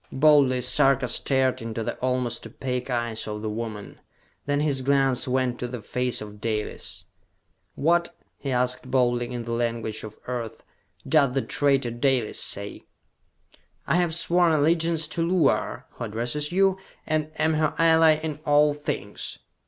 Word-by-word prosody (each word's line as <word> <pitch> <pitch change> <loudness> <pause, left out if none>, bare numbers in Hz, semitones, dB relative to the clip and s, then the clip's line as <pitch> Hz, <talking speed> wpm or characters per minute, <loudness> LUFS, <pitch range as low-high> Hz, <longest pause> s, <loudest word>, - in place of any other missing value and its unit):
Boldly 135 -3 +4
Sarka 130 +1 +3
stared 130 +1 +1
into 115 0 -4
the - - -3
almost 125 -1 -2
opaque 125 -1 -4
eyes 120 -3 -2
of 105 0 -5
the 110 - -2
woman. 110 -2 -6 0.5
Then 145 0 +1
his 145 -3 0
glance 135 -1 +2
went 125 -1 0
to 125 - -3
the 125 0 -6
face 125 +3 -1
of 105 -1 -10
Dalis. 110 -2 -3 0.7
"What," 170 +3 +1 0.2
he 140 - -5
asked 125 0 -1
boldly, 120 -2 +1
in 120 -1 -4
the 115 - -6
language 115 -2 -2
of 110 0 -9
Earth, 115 -3 -5 0.4
"does 140 -3 +3
the 135 - +1
traitor 140 -4 +1
Dalis 120 -1 0
say?" 100 0 -4 1.0
"I - - +2
have 175 -3 +1
sworn 175 0 +3
allegiance 160 +1 +2
to 170 - -2
Luar, 170 -3 +1
who - - -6
addresses 120 +8 -2
you, 190 +1 +2 0.3
and 155 -1 -1
am 160 0 +2
her 155 -1 0
ally 160 -1 +5
in 155 -2 -4
all 145 0 +4
things! 125 -9 -4
130 Hz, 155 wpm, -25 LUFS, 120-150 Hz, 1.0 s, ally